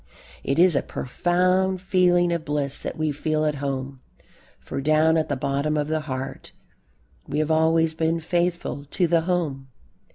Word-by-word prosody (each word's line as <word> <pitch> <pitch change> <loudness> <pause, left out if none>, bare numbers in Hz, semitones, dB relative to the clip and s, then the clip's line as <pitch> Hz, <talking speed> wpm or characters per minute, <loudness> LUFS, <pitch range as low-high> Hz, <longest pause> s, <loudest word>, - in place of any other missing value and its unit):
It 135 - -1
is 175 -1 +5
a - - +3
profound 180 +6 0
feeling 180 -2 +2
of 170 -2 -2
bliss 145 -3 -2
that - - -5
we 155 -1 0
feel 155 +1 -1
at 150 - +1
home, 135 -1 -4 0.6
for 135 - -5
down 155 +2 +3
at 160 -1 0
the 140 - 0
bottom 140 +3 -1
of 150 0 -1
the 155 0 0
heart 135 -3 -6 0.7
we 145 - -3
have 155 +1 0
always 160 0 +3
been 160 +1 0
faithful 170 -3 -2
to 175 +5 0
the 165 0 +2
home. 160 -6 -2
155 Hz, 165 wpm, -24 LUFS, 140-175 Hz, 0.7 s, is